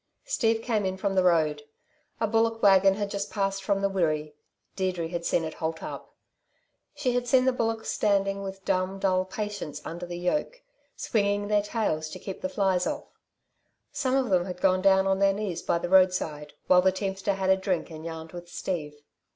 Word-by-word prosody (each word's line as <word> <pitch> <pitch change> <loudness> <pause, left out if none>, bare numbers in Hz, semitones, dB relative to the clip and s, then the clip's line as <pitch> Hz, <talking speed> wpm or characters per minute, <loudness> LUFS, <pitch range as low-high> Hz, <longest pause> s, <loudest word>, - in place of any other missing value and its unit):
Steve 225 - +1
came 220 -4 0
in 190 0 -2
from 195 0 -1
the 190 - +3
road. 160 -4 +2 0.6
A 225 - +2
bullock 225 +1 +1
wagon 195 -1 +6
had 205 0 -3
just 200 0 -3
passed 195 -1 -1
from 195 0 0
the - - +4
Wirree. 155 -6 -1 0.4
Deirdre 180 -4 -1
had 170 -1 -4
seen 170 - +1
it 160 -1 -4
halt 160 0 -4
up. - - -8 0.8
She 275 -4 0
had 245 0 -1
seen 255 +1 +4
the 260 - +3
bullocks 225 -2 -1
standing 195 -1 +1
with 195 0 -7
dumb, 185 +1 0
dull 185 -1 +1
patience 205 -7 -5
under 175 +2 -6
the 175 0 -5
yoke, 300 - -2 0.3
swinging 205 -1 0
their 210 -1 +3
tails 200 -8 -2
to - - -7
keep 195 - -7
the 280 - -2
flies 195 -8 +1
off. - - -4 0.8
Some 260 -2 0
of 260 -5 +1
them 180 -2 +3
had 180 -1 -6
gone 185 0 +3
down 190 0 +4
on 195 0 +1
their 195 0 +4
knees 200 -4 -3
by - - +1
the 170 - -3
roadside, 180 -5 +2
while 180 -1 +6
the 190 +1 +4
teamster 195 +1 -2
had 190 0 +1
a - - +6
drink 190 -3 -2
and 155 0 -8
yarned 160 -1 -7
with 175 -1 -9
Steve. 150 -6 -5
190 Hz, 200 wpm, -27 LUFS, 175-205 Hz, 0.8 s, wagon